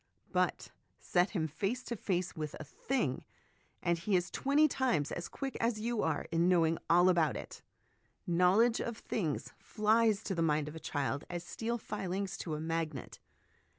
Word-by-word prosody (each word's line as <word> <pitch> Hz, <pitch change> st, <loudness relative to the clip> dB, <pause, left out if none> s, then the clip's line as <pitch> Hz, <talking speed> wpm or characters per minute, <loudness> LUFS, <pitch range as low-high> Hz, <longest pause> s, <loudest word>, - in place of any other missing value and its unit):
But -, -, 0 dB, 0.3 s
set 180 Hz, +1 st, +2 dB
him 165 Hz, -7 st, -1 dB
face 200 Hz, -, -2 dB
to 235 Hz, -, -4 dB
face 185 Hz, -3 st, -2 dB
with 155 Hz, -2 st, -4 dB
a -, -, -5 dB
thing, 155 Hz, -, -2 dB, 0.6 s
and 170 Hz, -1 st, +1 dB
he 190 Hz, +3 st, +1 dB
is 180 Hz, 0 st, +1 dB
twenty 290 Hz, +3 st, +3 dB
times 250 Hz, -, 0 dB
as 175 Hz, -, -4 dB
quick 270 Hz, -2 st, -5 dB
as 230 Hz, -1 st, +1 dB
you 230 Hz, 0 st, -1 dB
are -, -, 0 dB
in 170 Hz, +2 st, +3 dB
know 175 Hz, -3 st, +5 dB
ing 160 Hz, +1 st, 0 dB
all 175 Hz, +2 st, +6 dB
about 170 Hz, -4 st, +3 dB
it; -, -, -9 dB, 0.6 s
knowledge 185 Hz, +7 st, +4 dB
of 235 Hz, -1 st, -3 dB
things 165 Hz, -12 st, -3 dB
flies 215 Hz, -1 st, +2 dB
to 195 Hz, -, -2 dB
the 170 Hz, -, -1 dB
mind 150 Hz, -2 st, +2 dB
of 150 Hz, -, -7 dB
a -, -, -6 dB
child 145 Hz, -2 st, -2 dB
as 175 Hz, -1 st, -4 dB
steel 230 Hz, +6 st, -3 dB
filings 195 Hz, -2 st, -3 dB
to 160 Hz, -3 st, -3 dB
a -, -, -4 dB
magnet. 160 Hz, -4 st, -3 dB
180 Hz, 180 wpm, -33 LUFS, 165-225 Hz, 0.6 s, all